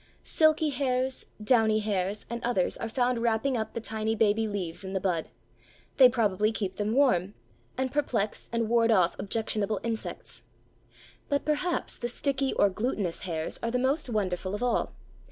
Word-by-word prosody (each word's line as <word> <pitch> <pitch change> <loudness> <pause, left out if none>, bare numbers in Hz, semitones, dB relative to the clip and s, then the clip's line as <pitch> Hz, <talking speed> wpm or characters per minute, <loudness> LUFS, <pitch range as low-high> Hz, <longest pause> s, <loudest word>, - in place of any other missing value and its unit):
Silky 315 -1 +3
hairs, 260 -1 -1 0.2
downy 220 -2 +4
hairs, 205 -1 -1
and 235 0 -5
others 235 -7 +1
are 230 - -4
found 245 0 0
wrapping 235 +3 +1
up 220 -2 -3
the - - -1
tiny 220 0 -2
baby 220 0 +2
leaves 185 -3 -4
in 190 0 -6
the 190 - 0
bud: 180 -4 -1 0.7
they 255 -2 +9
probably 215 -3 +1
keep 195 -4 -4
them 210 +1 -1
warm, 210 -9 +3 0.4
and 260 0 -1
perplex 245 -8 -1
and 230 -1 0
ward 230 0 +3
off 185 -6 +3
objectionable 215 -1 -1
insects. 230 -1 -5 0.9
But, 285 -1 0
perhaps, 305 +4 0
the 240 - -2
sticky 270 +2 -1
or - - +4
glutinous 200 -3 -2
hairs 160 -4 -4
are 230 - -1
the 250 - 0
most 265 +3 0
wonderful 190 -3 -1
of 210 - -4
all. 245 - 0
225 Hz, 165 wpm, -28 LUFS, 205-250 Hz, 0.9 s, they